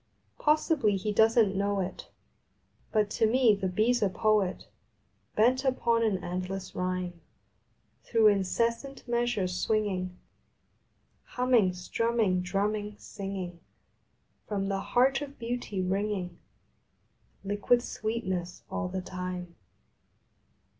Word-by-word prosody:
Possibly 300 Hz, -, +2 dB
he 210 Hz, +3 st, -2 dB
doesn 220 Hz, -1 st, +5 dB
t -, -, -7 dB
know 200 Hz, 0 st, 0 dB
it, 190 Hz, 0 st, -4 dB, 0.8 s
But 210 Hz, -2 st, +2 dB
to 225 Hz, -, +2 dB
me 240 Hz, -1 st, +5 dB
the 195 Hz, -2 st, -1 dB
Bee 215 Hz, +6 st, +2 dB
s 245 Hz, -1 st, +1 dB
a 205 Hz, -, +3 dB
Poet 210 Hz, -1 st, +1 dB, 0.7 s
Bent 250 Hz, +5 st, +3 dB
upon 235 Hz, -3 st, +2 dB
an 200 Hz, -5 st, +1 dB
endless 185 Hz, +2 st, -4 dB
rhyme 180 Hz, -1 st, -3 dB, 0.8 s
Through 225 Hz, -2 st, +5 dB
incessant 230 Hz, +8 st, -1 dB
measures 235 Hz, -6 st, 0 dB
swinging, 190 Hz, -4 st, 0 dB, 1.1 s
Humming, 245 Hz, -7 st, +2 dB
strumming, 200 Hz, +1 st, 0 dB
drumming, 205 Hz, +3 st, -1 dB
singing, 190 Hz, -4 st, -6 dB, 0.9 s
From 195 Hz, -2 st, -1 dB
the 195 Hz, -1 st, 0 dB
Heart 265 Hz, +7 st, +2 dB
of 285 Hz, -1 st, -7 dB
Beauty 230 Hz, -5 st, -3 dB
wringing 190 Hz, -2 st, -2 dB, 1.0 s
Liquid 205 Hz, +5 st, +2 dB
sweetness 190 Hz, -7 st, -3 dB
all 200 Hz, -, -2 dB
the 185 Hz, +1 st, -3 dB
time. 180 Hz, -1 st, -5 dB
205 Hz, 110 wpm, -29 LUFS, 185-230 Hz, 1.1 s, doesn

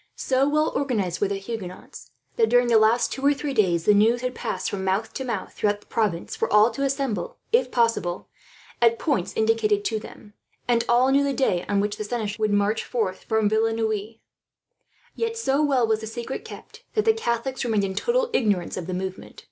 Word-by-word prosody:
So 270 Hz, +2 st, +1 dB
well 305 Hz, +1 st, +2 dB
organized 210 Hz, -11 st, -1 dB
were 205 Hz, -, +3 dB
the 200 Hz, -, -2 dB
Huguenots 195 Hz, -8 st, -8 dB, 0.3 s
that, 225 Hz, -1 st, +2 dB
during 245 Hz, 0 st, +4 dB
the 225 Hz, -2 st, +6 dB
last 220 Hz, +3 st, +3 dB
two 270 Hz, -, -5 dB
or 285 Hz, +1 st, +4 dB
three 280 Hz, +1 st, -4 dB
days, 175 Hz, -8 st, +2 dB
the 210 Hz, -, +6 dB
news 225 Hz, +4 st, +3 dB
had 255 Hz, 0 st, -2 dB
passed -, -, -3 dB
from 195 Hz, -2 st, -3 dB
mouth 190 Hz, +4 st, -1 dB
to 265 Hz, -, -4 dB
mouth 230 Hz, -7 st, -4 dB
throughout 205 Hz, -1 st, 0 dB
the -, -, -22 dB
province 205 Hz, -7 st, -2 dB
for -, -, -2 dB
all 210 Hz, +3 st, +5 dB
to 235 Hz, -, -6 dB
assemble, 275 Hz, -, -2 dB
if 475 Hz, +2 st, +3 dB
possible, 230 Hz, -7 st, 0 dB, 0.5 s
at 230 Hz, -1 st, +4 dB
points 200 Hz, -, -1 dB
indicated 220 Hz, -2 st, +2 dB
to 220 Hz, -1 st, 0 dB
them; 210 Hz, 0 st, -13 dB, 0.3 s
and 235 Hz, -1 st, +2 dB
all 250 Hz, +2 st, +4 dB
knew 280 Hz, +1 st, +4 dB
the 280 Hz, -1 st, 0 dB
day 185 Hz, -11 st, +1 dB
on 200 Hz, -1 st, +2 dB
which 205 Hz, 0 st, -2 dB
the -, -, -3 dB
seneschal 215 Hz, -1 st, -4 dB
would 215 Hz, -1 st, +2 dB
march 205 Hz, +2 st, +1 dB
north 205 Hz, -6 st, -2 dB
from 220 Hz, -2 st, +1 dB
Villeneuve. 220 Hz, 0 st, 0 dB, 1.0 s
Yet 460 Hz, 0 st, -2 dB
so 285 Hz, -10 st, +1 dB
well 275 Hz, -5 st, +3 dB
was 220 Hz, -1 st, +1 dB
the 220 Hz, -, -6 dB
secret 240 Hz, +3 st, -5 dB
kept, -, -, -12 dB
that 430 Hz, -, +1 dB
the 445 Hz, -, +5 dB
Catholics 265 Hz, -, -2 dB
remained 220 Hz, -4 st, +1 dB
in 190 Hz, -1 st, -2 dB
total 475 Hz, -, 0 dB
ignorance 205 Hz, -, 0 dB
of 175 Hz, -, -5 dB
the 185 Hz, -, -3 dB
movement. 190 Hz, 0 st, -6 dB
225 Hz, 205 wpm, -24 LUFS, 205-260 Hz, 1.0 s, the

